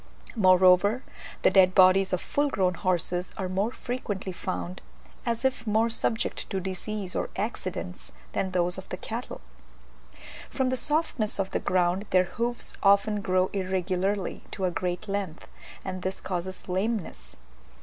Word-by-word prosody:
Moreover, 185 +3 +5 0.4
the - - +6
dead 185 -1 +5
bodies 190 0 +6
of 185 - +1
full 290 0 0
grown 185 -7 +1
horses 180 0 -1
are 190 - -2
more 190 +4 0
frequently 225 -7 -4
found, 90 - -4 0.5
as 235 +2 -1
if 250 -4 0
more 220 +2 +3
subject 225 0 -1
to 195 - -1
disease 190 +1 -4
or - - -1
accidents, 90 +1 -4 0.2
than 190 - -1
those 180 -1 0
of - - -12
the - - -4
cattle. - - -6 1.1
From 260 -1 0
the 260 - +1
softness 295 -6 0
of 195 0 -1
the - - 0
ground 180 +2 +1
their 185 0 +5
hoofs 235 +6 -3
often 200 +1 +4
grow 185 -1 +2
irregularly 190 0 -1
to 190 - -2
a 180 - +1
great 180 +3 -2
length, 195 -5 -3 0.4
and 185 -1 -4
this 185 +1 -2
causes 185 0 -4
lameness. 195 +2 -2
190 Hz, 150 wpm, -27 LUFS, 185-215 Hz, 1.1 s, the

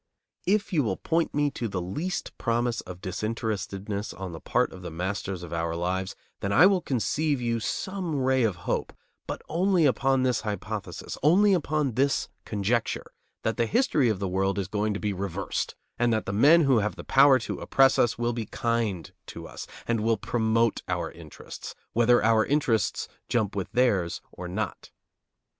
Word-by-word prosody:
If 205 +1 +1
you 155 - +4
will 105 -7 -1
point 165 0 0
me 145 -1 +2
to 120 -3 -3
the 95 -3 -3
least 150 - -4
promise 120 0 0
of 90 -1 -10
disinterestedness 100 0 -3
on 95 -2 -6
the 80 - -7
part 125 - +1
of 95 - -10
the 90 - -6
masters 95 +2 -3
of 85 -1 -7
our 85 0 -1
lives, 90 +2 -2 0.2
then 100 - -2
I 130 - +7
will 190 -2 +4
conceive 145 +2 0
you 115 -1 0
some 185 - -3
ray 130 -1 +2
of 110 -6 +2
hope; - - -1 0.3
but - - -5
only 180 0 +2
upon 135 -1 +2
this 125 -4 +1
hypothesis, 105 -3 -5
only 195 +8 +5
upon 150 -5 +1
this 135 +4 +1 0.2
conjecture: 110 +3 -1 0.3
that 110 - -1
the 115 -1 +2
history 220 - +2
of 110 - 0
the 100 0 -2
world 95 +2 0
is 95 -2 -1
going 105 +1 -1
to - - -3
be 105 -1 -1
reversed, 95 0 -3 0.2
and 120 -1 +3
that 110 -1 0
the 100 - -3
men 150 +11 +6
who 135 -6 +4
have 105 0 -1
the - - -8
power 135 0 +6
to 115 - -5
oppress 135 0 +4
us 120 - +3
will 120 0 0
be 115 -3 -4
kind 115 -8 -1 0.2
to - - -8
us, - - -8 0.2
and 115 -2 +1
will 115 0 +2
promote 115 +1 +1
our - - -2
interests, - - -10 0.2
whether 120 0 +4
our 110 0 +4
interests 125 -8 +1 0.2
jump 110 -5 0
with 100 -2 -3
theirs 105 -9 +2
or 90 - -7
not. 100 +3 -4
115 Hz, 185 wpm, -27 LUFS, 100-135 Hz, 0.3 s, I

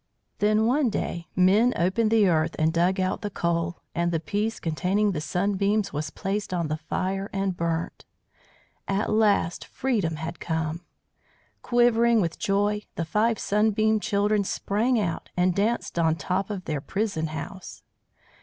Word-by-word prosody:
Then 215 +1 +3
one 260 +2 +2
day 170 -5 -3
men 200 +7 +4
opened 190 +6 +1
the 220 -3 +4
earth 160 -2 +1
and 160 0 +2
dug 180 +3 +2
out 185 0 -1
the 205 - -3
coal, 170 -2 -1 0.2
and 170 0 0
the 165 - 0
piece 210 +7 -2
containing 190 +6 0
the 155 -5 -3
Sunbeams 200 +4 0
was 150 +1 -3
placed 195 +1 -3
on 170 -3 -1
the 155 - -1
fire 190 +5 -3
and 195 -2 -1
burnt. 165 -1 -3 0.8
At 195 +2 0
last 205 -6 +2
freedom 210 -12 -1
had 160 +3 -6
come. 160 0 -2 0.8
Quivering 235 -1 +3
with 170 -4 -1
joy, 205 0 +1
the 165 - -2
five 215 +7 +1
Sunbeam 215 +1 +2
Children 205 0 +1
sprang 220 +5 0
out 175 -6 -3
and 180 0 +3
danced 205 -2 -1
on 160 -1 +3
top 185 +4 -2
of 195 -3 -5
their 150 -3 -2
prison 195 -3 -2
house. 160 +4 -8
195 Hz, 155 wpm, -26 LUFS, 170-210 Hz, 0.8 s, men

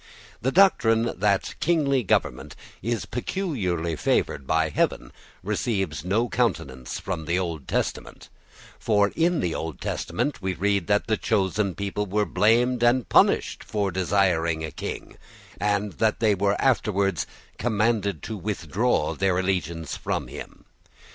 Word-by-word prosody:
The 130 +5 +1
doctrine 120 -12 +4
that 100 -1 +1
kingly 145 -5 +2
government 70 - 0 0.3
is 115 +2 -2
peculiarly 105 - -2
favoured 70 -2 0
by 80 0 +2
Heaven - - -1 0.3
receives 95 - -1
no 105 +7 +1
countenance 65 - -2
from 90 -4 -4
the 85 +3 0
Old 85 -7 -3
Testament; - - -3 0.5
for 105 -2 +3
in 170 +1 +2
the 85 -3 -1
Old 80 -1 -5
Testament 125 0 -2
we 95 -1 -2
read 100 0 0
that 105 0 +2
the 110 -1 +1
chosen 95 -1 0
people 100 +2 -3
were 105 +2 +1
blamed 115 +6 +2
and 120 +1 +3
punished - - +3
for 100 -2 -1
desiring 90 -4 +1
a 80 - -7
king, - - -6 0.4
and 105 0 0
that 110 -1 +2
they 110 -2 +3
were 100 +1 +1
afterwards 100 - +1 0.3
commanded 105 -4 0
to 110 - -4
withdraw 100 -1 0
their 95 -2 +1
allegiance 85 -4 -2
from - - -2
him. - - -10
100 Hz, 135 wpm, -25 LUFS, 85-115 Hz, 0.5 s, doctrine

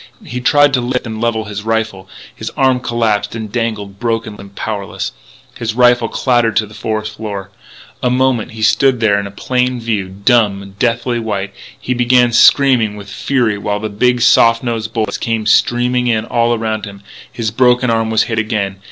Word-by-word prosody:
He 125 +1 -5
tried 145 +2 +4
to 125 - +2
lift 125 +1 -2
and 110 -1 -6
level 115 -2 -1
his 105 0 -6
rifle; 110 -4 -2 0.2
his 110 - -6
arm 130 -2 +3
collapsed 110 -4 -1
and 110 -2 -6
dangled 110 -4 -3
broken 115 -2 -2
and 100 0 -12
powerless; 100 -3 -4 0.4
his 115 -1 -4
rifle 120 -1 +4
clattered 120 -4 +1
to 110 +1 +2
the 105 - -15
forest 110 -1 -4
floor. 100 -3 -6 0.5
For - - +1
a - - +2
moment 125 -3 0
he 110 -1 -6
stood 130 +2 +3
there 105 -3 +2
in 100 0 -5
plain 125 +3 -1
view, 110 -5 -2
dumb, 100 -1 +1
deathly 120 0 0
white; 100 -3 -3
then - - -17
he 125 - -1
began 125 0 +3
screaming 120 -5 +4
with 100 -1 -10
fury 120 -6 0
while 105 0 -2
the 110 +1 -4
big, 125 +4 +1
soft 115 0 +4
nosed 115 -2 -3
bullets 110 -3 -2
came 115 -2 -2
streaming 125 +3 +2
in 110 -2 +1
all 120 0 +1
around 110 -1 -3
him. 100 -1 -11 0.3
His 110 -3 -3
broken 125 +1 +3
arm 115 -1 0
was 110 0 +3
hit 115 -1 -2
again. 105 -3 -2
115 Hz, 185 wpm, -15 LUFS, 105-120 Hz, 0.5 s, tried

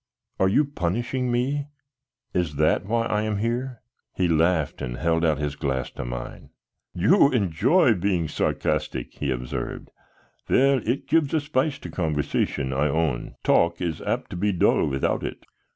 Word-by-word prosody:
"Are 95 - +4
you 145 +10 +3
punishing 120 +2 -2
me? 140 +4 0 0.7
Is 85 -5 -1
that 75 +5 +2
why 115 +1 +1
I 105 -1 0
am 110 -1 -1
here?" 120 +3 -2 0.3
He 90 - +1
laughed 80 -1 +1
and - - -4
held 85 -1 +1
out 80 -3 +2
his 75 -1 -3
glass 65 -3 -2
to - - -6
mine. - - -7 0.5
"You 140 - +5
enjoy 120 - +3
being 90 -4 0
sarcastic," - - -2
he 70 - -1
observed. 60 -1 -4 0.6
"Well, 135 0 +4
it 135 +2 -1
gives 155 0 +2
a - - +3
spice 145 -1 0
to - - -9
conversation, 75 -4 -1
I 70 +3 +1
own. 75 -4 -1
Talk 85 0 +3
is 85 -4 -3
apt - - -2
to - - -5
be 100 +4 +1
dull 90 - +3
without 65 -1 -1
it." - - -6
90 Hz, 160 wpm, -24 LUFS, 75-125 Hz, 0.7 s, You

